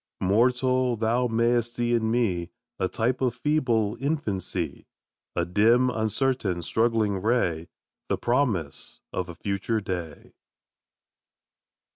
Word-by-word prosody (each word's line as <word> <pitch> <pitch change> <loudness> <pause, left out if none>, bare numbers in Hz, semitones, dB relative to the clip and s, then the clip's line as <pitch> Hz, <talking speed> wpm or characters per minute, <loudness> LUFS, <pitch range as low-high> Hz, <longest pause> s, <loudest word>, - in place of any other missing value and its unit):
Mortal! 125 +5 +2
thou 115 +3 +1
mayst 120 +1 +1
see 120 0 0
in 110 -2 +1
me 95 -8 0 0.3
A 95 - +1
type 120 +6 -1
of 125 -3 +1
feeble 125 -7 +1
infancy, 100 - -3 0.5
A - - +1
dim, 115 +7 +4
uncertain, 110 -5 0
struggling 110 -2 +1
ray, 90 -8 0 0.4
The - - +1
promise 120 - -1
of 90 -1 -3
a 85 - -7
future 100 +4 -1
day! 90 -7 -6
115 Hz, 110 wpm, -26 LUFS, 95-125 Hz, 0.5 s, dim